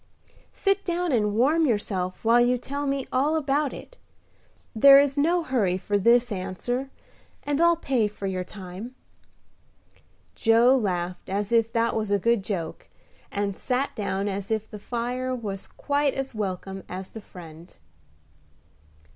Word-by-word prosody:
"Sit 395 Hz, 0 st, 0 dB
down 350 Hz, -1 st, -1 dB
and 210 Hz, -4 st, +1 dB
warm 300 Hz, +7 st, +3 dB
yourself 195 Hz, -5 st, -2 dB
while 235 Hz, +2 st, +5 dB
you 245 Hz, +1 st, +3 dB
tell 280 Hz, +3 st, -4 dB
me 275 Hz, -1 st, -1 dB
all 285 Hz, +5 st, +2 dB
about 290 Hz, -1 st, 0 dB
it; -, -, -11 dB, 0.8 s
there 275 Hz, +5 st, +9 dB
is 280 Hz, -1 st, +2 dB
no 335 Hz, +4 st, +2 dB
hurry 215 Hz, -, +1 dB
for 200 Hz, +2 st, -3 dB
this 235 Hz, +4 st, +4 dB
answer, 205 Hz, +8 st, -3 dB, 0.5 s
and 290 Hz, +2 st, 0 dB
I'll 340 Hz, 0 st, +5 dB
pay 260 Hz, -9 st, +1 dB
for 205 Hz, -1 st, -8 dB
your 185 Hz, -1 st, -2 dB
time." 195 Hz, +6 st, -9 dB, 1.4 s
Joe 235 Hz, +3 st, +4 dB
laughed 180 Hz, -6 st, -2 dB
as 200 Hz, +2 st, -2 dB
if 230 Hz, -1 st, +3 dB
that 230 Hz, 0 st, +1 dB
was 215 Hz, -2 st, -1 dB
a 205 Hz, -, +3 dB
good 230 Hz, +1 st, +1 dB
joke, 175 Hz, -6 st, -5 dB, 0.4 s
and 200 Hz, -1 st, -2 dB
sat 255 Hz, +5 st, -2 dB
down 200 Hz, -1 st, -2 dB
as 200 Hz, 0 st, -4 dB
if 220 Hz, -1 st, -1 dB
the 210 Hz, -, -9 dB
fire 245 Hz, +3 st, -3 dB
was 200 Hz, -5 st, -5 dB
quite 285 Hz, -1 st, -1 dB
as 270 Hz, -1 st, -4 dB
welcome 195 Hz, -2 st, -4 dB
as 185 Hz, +1 st, -6 dB
the 220 Hz, -, -9 dB
friend. 170 Hz, -3 st, -13 dB
230 Hz, 150 wpm, -25 LUFS, 195-270 Hz, 1.4 s, there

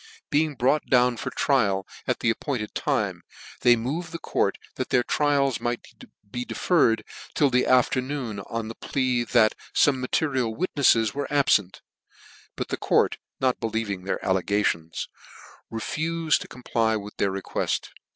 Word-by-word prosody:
Being 150 Hz, 0 st, +2 dB
brought 135 Hz, +5 st, +1 dB
down 125 Hz, -1 st, +4 dB
for 130 Hz, -, -3 dB
trial 110 Hz, -8 st, +1 dB, 0.2 s
at -, -, 0 dB
the 115 Hz, -, +3 dB
appointed 115 Hz, -3 st, -3 dB
time, -, -, -1 dB, 0.4 s
they 120 Hz, -1 st, +6 dB
moved 140 Hz, +10 st, -3 dB
the 165 Hz, -, -4 dB
court -, -, 0 dB, 0.2 s
that -, -, -4 dB
their 125 Hz, -, +3 dB
trials 140 Hz, -1 st, +1 dB
might 120 Hz, 0 st, -2 dB, 0.5 s
be 125 Hz, +1 st, -3 dB
deferred 115 Hz, -7 st, +2 dB, 0.3 s
till 145 Hz, -3 st, +3 dB
the 125 Hz, +1 st, +2 dB
afternoon, 130 Hz, -2 st, +1 dB
on 115 Hz, +3 st, -4 dB
the 115 Hz, -, -6 dB
plea 125 Hz, -1 st, 0 dB
that 115 Hz, -3 st, +4 dB, 0.2 s
fome 140 Hz, -3 st, +4 dB
material 130 Hz, -3 st, 0 dB
witnefles 135 Hz, -, +3 dB
were 145 Hz, 0 st, -3 dB
abfent: 120 Hz, -10 st, +2 dB, 0.7 s
but -, -, -4 dB
the -, -, -2 dB
court -, -, +2 dB, 0.2 s
not 130 Hz, -1 st, +1 dB
believing 110 Hz, -4 st, -2 dB
their 100 Hz, -, -1 dB
allegar.ons, 95 Hz, -3 st, 0 dB, 0.6 s
refufed 155 Hz, +8 st, 0 dB
to -, -, -8 dB
comply 115 Hz, -3 st, 0 dB
with 105 Hz, -1 st, -6 dB
their 100 Hz, -, +1 dB
requcft. 95 Hz, 0 st, -2 dB
125 Hz, 145 wpm, -25 LUFS, 110-140 Hz, 0.7 s, they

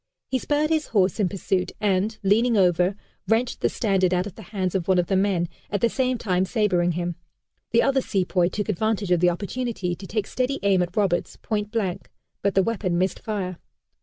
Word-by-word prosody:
He 260 Hz, -, +1 dB
spurred 300 Hz, +4 st, 0 dB
his 310 Hz, -2 st, +1 dB
horse 195 Hz, -4 st, +2 dB
in 195 Hz, -4 st, +2 dB
pursuit, 190 Hz, -1 st, -1 dB
and, 205 Hz, +1 st, +1 dB
leaning 225 Hz, +4 st, +3 dB
over, 180 Hz, 0 st, +3 dB, 0.3 s
wrenched 235 Hz, +2 st, +1 dB
the -, -, +3 dB
standard 190 Hz, -5 st, +1 dB
out 180 Hz, +1 st, 0 dB
of 205 Hz, -, -7 dB
the 220 Hz, -, -12 dB
hands 190 Hz, -4 st, -2 dB
of 185 Hz, -3 st, -1 dB
one 190 Hz, -1 st, +4 dB
of 175 Hz, -, +3 dB
the 190 Hz, -, 0 dB
men, 190 Hz, -3 st, +1 dB, 0.2 s
at 205 Hz, -, -1 dB
the 235 Hz, -, +3 dB
same 255 Hz, 0 st, 0 dB
time 185 Hz, -5 st, 0 dB
sabering 185 Hz, -4 st, +1 dB
him. 175 Hz, 0 st, -3 dB, 0.5 s
The 230 Hz, -, +3 dB
other 275 Hz, -1 st, +2 dB
sepoy 185 Hz, -5 st, +1 dB
took 205 Hz, +2 st, -3 dB
advantage 210 Hz, -1 st, 0 dB
of 175 Hz, -, +4 dB
the 180 Hz, +1 st, +4 dB
opportunity 200 Hz, 0 st, -3 dB
to 190 Hz, +2 st, -8 dB
take 210 Hz, 0 st, -1 dB
steady 255 Hz, +5 st, -1 dB
aim 195 Hz, -2 st, +3 dB
at 180 Hz, +2 st, -3 dB
Roberts, 190 Hz, -4 st, 0 dB
point 210 Hz, -1 st, -2 dB
blank, 210 Hz, -5 st, -2 dB, 0.3 s
but 200 Hz, 0 st, 0 dB
the 195 Hz, -, +5 dB
weapon 190 Hz, -5 st, -1 dB
missed 185 Hz, +1 st, 0 dB
fire. 190 Hz, -5 st, -4 dB
195 Hz, 205 wpm, -24 LUFS, 180-220 Hz, 0.5 s, the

